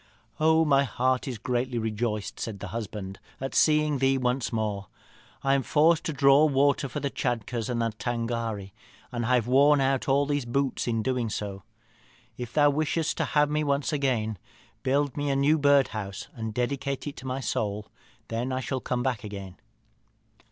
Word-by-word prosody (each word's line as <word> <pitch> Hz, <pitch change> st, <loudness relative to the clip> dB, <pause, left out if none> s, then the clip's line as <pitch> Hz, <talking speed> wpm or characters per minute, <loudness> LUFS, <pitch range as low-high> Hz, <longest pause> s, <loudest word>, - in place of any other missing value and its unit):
'Oh! 160 Hz, +1 st, +4 dB
my 140 Hz, -2 st, +4 dB
heart 130 Hz, +1 st, 0 dB
is 125 Hz, -3 st, -3 dB
greatly 125 Hz, +2 st, -1 dB
rejoiced,' 110 Hz, -1 st, -2 dB
said 110 Hz, -3 st, -4 dB
the 100 Hz, -, -6 dB
husband, 105 Hz, -3 st, -6 dB, 0.2 s
'at 135 Hz, 0 st, -4 dB
seeing 150 Hz, -2 st, +3 dB
thee 135 Hz, 0 st, +3 dB
once 125 Hz, 0 st, 0 dB
more. 105 Hz, -4 st, -2 dB, 0.6 s
I 135 Hz, -, +3 dB
am 140 Hz, -, +3 dB
forced 160 Hz, +5 st, +3 dB
to 165 Hz, -, -1 dB
draw 140 Hz, +1 st, +5 dB
water 140 Hz, -1 st, +2 dB
for -, -, -4 dB
the 140 Hz, -, -2 dB
Tschadkurrs 120 Hz, -1 st, -2 dB
and 120 Hz, -1 st, -1 dB
the 115 Hz, -, 0 dB
Tângâri, 115 Hz, -3 st, -3 dB, 0.4 s
and 120 Hz, -2 st, -2 dB
have 125 Hz, -3 st, +3 dB
worn 140 Hz, +4 st, +5 dB
out 135 Hz, 0 st, +1 dB
all 140 Hz, +1 st, +3 dB
these 145 Hz, -1 st, -1 dB
boots 135 Hz, +2 st, -1 dB
in 115 Hz, -2 st, 0 dB
doing 125 Hz, -2 st, 0 dB
so. 100 Hz, -2 st, -4 dB, 0.7 s
If 120 Hz, -1 st, -6 dB
thou 145 Hz, 0 st, +4 dB
wishest 155 Hz, +2 st, 0 dB
to -, -, +1 dB
have 150 Hz, 0 st, +2 dB
me 150 Hz, 0 st, +1 dB
once 140 Hz, +1 st, 0 dB
again, 115 Hz, -, 0 dB, 0.4 s
build 140 Hz, 0 st, +1 dB
me 145 Hz, 0 st, -1 dB
a 135 Hz, -, +1 dB
new 145 Hz, +3 st, +3 dB
birdhouse, 125 Hz, -9 st, +1 dB
and 110 Hz, -1 st, -4 dB
dedicate 135 Hz, +4 st, -2 dB
it 145 Hz, -, -5 dB
to 130 Hz, -, -8 dB
my 130 Hz, +1 st, -2 dB
soul; 105 Hz, -5 st, -2 dB, 0.4 s
then 120 Hz, +3 st, -2 dB
I 130 Hz, -, -1 dB
shall 130 Hz, +1 st, -2 dB
come 125 Hz, 0 st, -2 dB
back 125 Hz, -5 st, -1 dB
again.' 100 Hz, -3 st, -8 dB
130 Hz, 180 wpm, -27 LUFS, 115-140 Hz, 0.7 s, draw